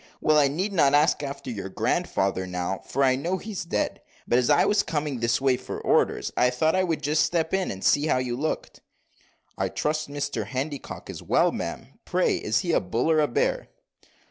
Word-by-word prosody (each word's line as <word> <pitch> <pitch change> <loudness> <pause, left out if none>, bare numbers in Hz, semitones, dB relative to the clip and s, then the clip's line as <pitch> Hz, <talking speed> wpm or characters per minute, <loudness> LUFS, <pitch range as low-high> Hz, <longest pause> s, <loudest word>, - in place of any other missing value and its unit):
Well, 155 0 +4
I 145 - +5
need 185 +9 -2
not 145 -6 +4
ask 150 +1 +3
after 140 -2 -5
your 100 -4 -5
grandfather 95 0 -1
now, 90 +1 -3
for 140 - -1
I 130 -1 +4
know 170 +8 -2
he's 200 -1 -5
dead; 105 -11 -2 0.3
but 120 - +3
as 125 - 0
I - - +5
was 205 0 +3
coming 150 -4 -3
this 115 0 +1
way 135 -2 +2
for - - -6
orders, - - +1
I 125 - +4
thought 155 +6 +1
I 185 - +2
would 165 -3 -2
just 150 +2 +2
step 165 -1 0
in 190 -1 +1
and 95 -1 -6
see 145 +2 +3
how 145 - +2
you 125 -1 -2
looked." 155 +5 -4 0.8
"I - - 0
trust 155 0 -2
Mr 145 0 -3
Handycock 135 +2 -5
is - - -8
well, - - +2
ma'am. - - -6
Pray - - +1
is - - 0
he - - -1
a - - +4
bull 115 - 0
or 155 - +4
a 150 - +3
bear?" 120 - 0
145 Hz, 210 wpm, -25 LUFS, 125-160 Hz, 0.8 s, I